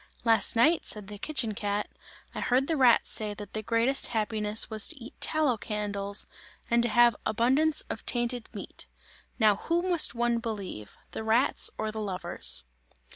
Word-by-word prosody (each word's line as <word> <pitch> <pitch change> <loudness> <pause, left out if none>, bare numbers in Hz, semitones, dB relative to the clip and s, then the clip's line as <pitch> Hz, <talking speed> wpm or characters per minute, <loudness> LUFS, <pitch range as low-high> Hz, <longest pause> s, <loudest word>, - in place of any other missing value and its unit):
"Last 225 0 +3
night," 310 +9 +3
said 210 -2 -4
the 205 -1 -9
kitchen 240 -5 -1
cat, 205 0 -2 0.5
"I - - -6
heard 255 +2 +1
the 325 - -1
rats 255 -5 +3
say 210 -1 -1
that 205 0 -10
the 215 - -3
greatest 230 +5 +2
happiness 215 -1 +1
was 220 -2 +1
to 330 - -2
eat 245 -1 -11
tallow 305 -7 +2
candles, 205 -1 -3 0.5
and 235 0 +4
to 240 - -1
have 240 -1 +4
abundance 265 +8 +2
of 220 - -6
tainted 240 -1 -1
meat. - - -9 0.5
Now 215 -4 +3
who 340 +9 -1
must 350 -8 +3
one 235 0 +1
believe, 200 - -6
the - - -6
rats 225 +4 +3
or 215 0 -3
the 220 0 -5
lovers?" 125 - -1
225 Hz, 170 wpm, -28 LUFS, 210-245 Hz, 0.5 s, and